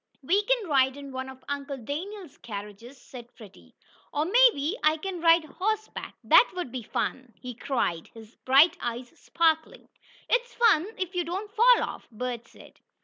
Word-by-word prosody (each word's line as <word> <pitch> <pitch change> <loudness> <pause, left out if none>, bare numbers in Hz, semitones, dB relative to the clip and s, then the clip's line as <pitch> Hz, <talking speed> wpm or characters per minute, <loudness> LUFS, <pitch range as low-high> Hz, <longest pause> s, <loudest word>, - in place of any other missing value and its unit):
"We 380 +9 +2
can - - +1
ride 265 -2 +2
in 280 -1 -9
one 260 0 -5
of 260 0 -13
Uncle 280 0 -4
Daniel's 330 - -7
carriages," 210 +3 -9
said 245 -1 -12
Freddie. 205 -5 -16 0.4
"Or 295 +1 -1
maybe 410 - +4
I 310 +1 +3
can 360 +1 -6
ride 330 0 +5
horse 435 +6 -2
back. - - -8
That - - +6
would 355 -9 -4
be 255 -1 -5
fun!" 245 +2 -4
he 250 0 -7
cried, 225 -9 -2
his 225 0 -14
bright 285 +6 +5
eyes 240 +1 -4
sparkling. 325 -1 -1 0.4
"It's 485 0 0
fun 415 -8 +4
if 370 0 -4
you 355 -1 0
don't 380 +5 -5
fall 475 +2 +5
off," - - -7
Bert 240 0 -5
said. - - -17
290 Hz, 170 wpm, -27 LUFS, 250-370 Hz, 0.4 s, That